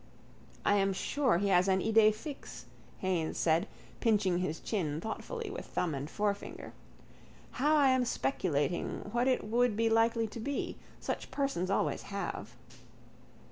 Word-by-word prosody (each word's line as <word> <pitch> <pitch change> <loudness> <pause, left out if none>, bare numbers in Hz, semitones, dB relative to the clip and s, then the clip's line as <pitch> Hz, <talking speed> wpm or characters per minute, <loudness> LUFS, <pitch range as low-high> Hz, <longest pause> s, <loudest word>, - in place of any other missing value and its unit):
—I 205 - +4
am 195 0 +2
sure 255 +2 +1
he 200 +2 0
has 180 0 +4
an 190 0 +3
idée 220 +1 +5
fixe, 270 +7 -8 0.4
Haines 180 -4 0
said, 165 0 +2 0.3
pinching 205 -6 +2
his 160 -3 -2
chin 155 -8 -2
thoughtfully 410 - -5
with 460 - -7
thumb 170 -4 -1
and 140 +2 -4
forefinger. 205 +1 -3 0.9
Now 300 +4 +4
I 285 -3 +5
am 260 -1 +3
speculating 175 - -1
what 240 +3 +1
it 255 - +2
would 235 0 +2
be 225 0 +2
likely 225 0 +3
to 230 - -8
be. 280 +5 -3 0.2
Such - - -4
persons 275 -11 -1
always 195 - +1
have. 200 0 -5
210 Hz, 145 wpm, -32 LUFS, 185-245 Hz, 0.9 s, idée